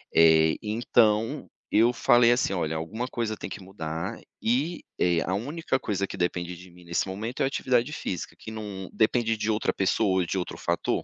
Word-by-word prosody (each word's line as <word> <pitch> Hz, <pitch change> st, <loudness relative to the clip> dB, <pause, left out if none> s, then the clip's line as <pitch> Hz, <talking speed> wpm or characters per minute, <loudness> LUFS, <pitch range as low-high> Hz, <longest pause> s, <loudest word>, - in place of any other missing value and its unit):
Eh, 80 Hz, -1 st, +6 dB
então 115 Hz, +3 st, +2 dB, 0.3 s
eu 115 Hz, +2 st, +6 dB
falei 120 Hz, 0 st, +5 dB
assim: 120 Hz, -5 st, +2 dB
"Olha, 80 Hz, -3 st, -1 dB
alguma 110 Hz, +10 st, -4 dB
coisa 115 Hz, -4 st, -2 dB
tem -, -, -6 dB
que -, -, -7 dB
mudar 80 Hz, -4 st, -5 dB, 0.2 s
e 140 Hz, +9 st, 0 dB, 0.2 s
é 85 Hz, -2 st, +3 dB
a 95 Hz, -, -2 dB
única 135 Hz, +4 st, -2 dB
coisa 100 Hz, -2 st, -1 dB
que -, -, -7 dB
depende 90 Hz, 0 st, -1 dB
de 90 Hz, +1 st, -13 dB
mim 90 Hz, 0 st, -16 dB
nesse 85 Hz, +3 st, -1 dB
momento 110 Hz, +6 st, -4 dB
é -, -, +4 dB
a -, -, +2 dB
atividade 130 Hz, -1 st, +1 dB
física, 90 Hz, -, -4 dB
que 110 Hz, -, -9 dB
não 100 Hz, -4 st, -6 dB
depende 115 Hz, 0 st, +2 dB
de 110 Hz, +1 st, -2 dB
outra 105 Hz, -, 0 dB
pessoa 95 Hz, 0 st, +2 dB
ou -, -, 0 dB
de 95 Hz, -, -2 dB
outro 90 Hz, -, -4 dB
fator". 85 Hz, 0 st, -1 dB
105 Hz, 195 wpm, -27 LUFS, 90-120 Hz, 0.3 s, Eh